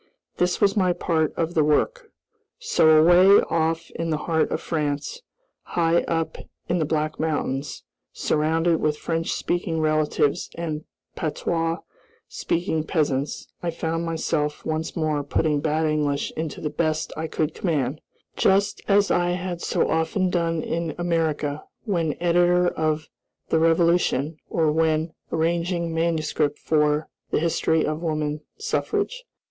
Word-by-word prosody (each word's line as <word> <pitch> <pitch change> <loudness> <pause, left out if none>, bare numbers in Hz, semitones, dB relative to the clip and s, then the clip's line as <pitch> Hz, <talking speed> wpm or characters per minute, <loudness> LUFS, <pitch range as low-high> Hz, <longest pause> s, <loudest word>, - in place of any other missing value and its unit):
This 180 0 +1
was 200 +1 +3
my 185 -3 +3
part 160 -3 0
of 165 0 -1
the 155 - +3
work. 445 - +1 0.5
So, 465 - +3
away 175 +5 +7
off 165 0 0
in 165 0 -3
the 155 - +1
heart 160 -1 +1
of - - -1
France, 150 - -2 0.4
high 170 0 +1
up 165 -1 -2 0.3
in 175 0 +1
the 155 - +1
Black 155 0 -1
Mountains, 145 -3 -2 0.3
surrounded 160 +2 +1
with 150 -1 +1
French 165 +1 -2
speaking 175 -2 -1
relatives 155 0 +1
and 160 -2 -4 0.3
patois 165 +1 -1 0.5
speaking 165 -2 -1
peasants, 145 -4 -1
I 175 - -1
found 165 0 -2
myself 160 -2 -2
once 160 0 -2
more 155 -3 0
putting 150 +1 +1
bad 155 +1 0
English 150 -2 0
into 160 -1 -4
the 150 - -2
best 155 -1 -1
I 160 +1 -3
could 155 0 -1
command, 150 -5 -1 0.3
just 195 +2 +2
as 200 0 +4
I 175 0 +2
had 180 -1 -4
so - - +1
often 160 +3 0
done 165 -2 0
in 165 -1 -2
America, 160 -4 -1 0.2
when 170 -8 0
editor 175 +1 +3
of 155 -1 -1 0.4
The 160 - +3
Revolution, 165 -2 +2
or 160 -2 +2
when 160 0 +1 0.2
arranging 170 +1 0
manuscript 160 -3 0
for 150 -1 +1 0.2
"The - - +1
History 160 0 +1
of 155 +1 -2
Woman 155 -2 -2 0.2
Suffrage." 435 +2 -2
160 Hz, 140 wpm, -24 LUFS, 155-170 Hz, 0.5 s, away